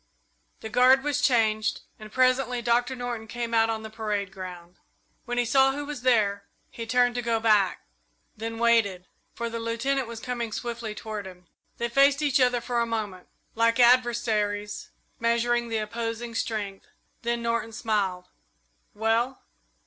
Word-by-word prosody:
The 220 - -6
guard 255 +3 +5
was 290 0 0
changed, 220 -5 +2 0.2
and 215 -1 -10
presently 255 0 +2
Doctor 240 +2 +1
Norton 240 -3 -5
came 235 +1 -4
out 225 0 +4
on 220 -1 -2
the 220 - -7
parade 210 -3 -2
ground. 180 -2 -9 0.5
When 245 0 -3
he 245 - +2
saw 270 +2 +4
who 290 +1 -4
was 290 -3 -6
there, 205 -5 +2 0.3
he 230 -1 -7
turned 245 +1 +3
to 245 - -2
go 230 -1 0
back, 210 -4 +2 0.5
then 225 +1 -5
waited, 225 -6 +2 0.3
for 235 - -3
the 230 0 -4
Lieutenant 235 +3 -1
was 230 -1 -7
coming 235 -1 -4
swiftly 235 -1 -4
toward 210 -3 -6
him. 180 -1 -13 0.3
They 235 - -1
faced 275 +4 +4
each 280 -1 +3
other 245 -1 +3
for 240 0 -1
a 235 - 0
moment, 210 -5 -4 0.3
like 230 +1 +2
adversaries 230 -4 +2 0.3
measuring 235 +1 +1
the 225 - -1
opposing 230 +2 -4
strength, 210 -4 -3 0.3
then 235 0 -1
Norton 230 -1 -1
smiled. 200 -6 -1 0.7
"Well?" 225 +4 0
230 Hz, 155 wpm, -26 LUFS, 215-245 Hz, 0.7 s, guard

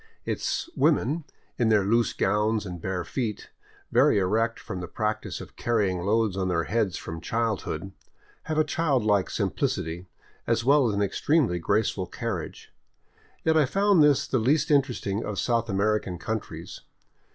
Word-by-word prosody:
Its - - -2
women, 155 0 +2 0.3
in 115 -2 +3
their 105 -3 +4
loose 115 +4 +2
gowns 105 +2 +1
and 90 -3 -7
bare 95 -1 -2
feet, 110 +2 -4 0.4
very - - +4
erect 110 +4 +1
from 90 - -6
the 90 - -5
practice 110 +2 -3
of - - -11
carry 110 -5 +1
ing 90 - -3
loads 105 +2 +1
on 95 -1 -1
their 85 -2 +1
heads 105 -1 0
from 80 +1 -7
childhood, 105 -6 -2 0.5
have 155 -1 -2
a 155 - +5
childlike 130 - +1
simplicity, 85 +3 -2 0.4
as 115 0 +1
well 140 -2 +5
as 105 - -1
an 100 - +1
extremely 115 - +1
graceful 85 - 0
carriage. - - -5 0.7
Yet 160 0 +3
I 155 -4 +4
found 195 +2 +3
this 145 -2 +4
the 130 - 0
least 150 +8 +2
interesting 125 -7 +1
of 105 -2 -4
South 115 0 0
American 100 -2 0
countries. 110 +6 -5
110 Hz, 155 wpm, -26 LUFS, 95-130 Hz, 0.7 s, a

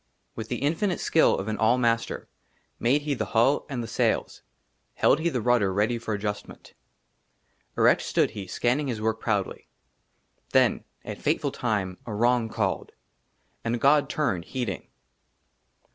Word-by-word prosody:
WITH 110 0 -6
THE 125 - -3
INFINITE 170 +6 0
SKILL 160 - +3
OF 95 - -4
AN 110 -1 -3
ALL 115 +3 +4
MASTER 115 -2 0 0.5
MADE 135 +6 +2
HE 150 -1 -1
THE 130 - -2
HULL 130 +6 +3
AND 125 -4 -3
THE - - -6
SAILS, - - 0 0.5
HELD 150 - +4
HE 170 +2 +1
THE 125 -7 -2
RUDDER 120 -5 +2
READY 110 +5 +1
FOR 110 -2 -3
ADJUSTMENT. 105 0 -6 1.0
ERECT - - +5
STOOD - - +1
HE, 100 -2 -7
SCANNING 130 +9 0
HIS 120 -4 -3
WORK 110 +1 -1
PROUDLY. 105 -4 -2 0.9
THEN - - +3 0.2
AT - - -7
FATEFUL - - 0
TIME 100 -6 -2
A 105 - -4
WRONG 120 +1 +2
CALLED, 100 -4 -2 0.7
AND 115 +1 -1
GOD 145 +3 +4
TURNED, 95 - -1
HEEDING. 120 -8 -4
115 Hz, 150 wpm, -26 LUFS, 105-130 Hz, 1.0 s, ERECT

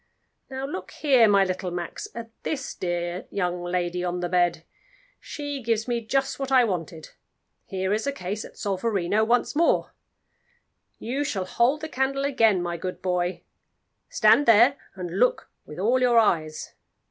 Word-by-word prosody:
Now 265 0 -4
look 185 -9 -6
here, 260 -7 +4
my 200 -1 +5
little 185 0 -3
Max, 175 -1 -5
at 230 -1 -7
this 280 -3 -4
dear 175 0 -3
young 180 -3 -2
lady 175 0 -2
on 180 0 -2
the 175 0 -2
bed. 175 -2 +1 0.6
She 290 -2 -6
gives 225 -1 -1
me 240 -1 -1
just 270 +5 -1
what 270 -1 -3
I 260 -2 +6
wanted; 165 -6 -4 0.6
here 190 0 -1
is 215 +1 -1
the 280 - 0
case 205 -4 -5
at - - -13
Solferino 200 0 0
once 240 +5 +1
more. 335 +2 +2 1.0
You 265 +5 -2
shall 195 -9 -2
hold 245 +10 +1
the 315 - -4
candle 275 -1 -1
again, 225 -9 +3
my 175 -1 -3
good 180 +2 -6
boy; 180 0 -1 0.7
stand 290 - +4
there, 235 +5 +6 0.2
and 180 0 -5
look 250 - +1 0.2
with 150 - -10
all 235 +7 +2
your 245 -2 +4
eyes. 160 -8 +1
205 Hz, 160 wpm, -25 LUFS, 180-255 Hz, 1.0 s, I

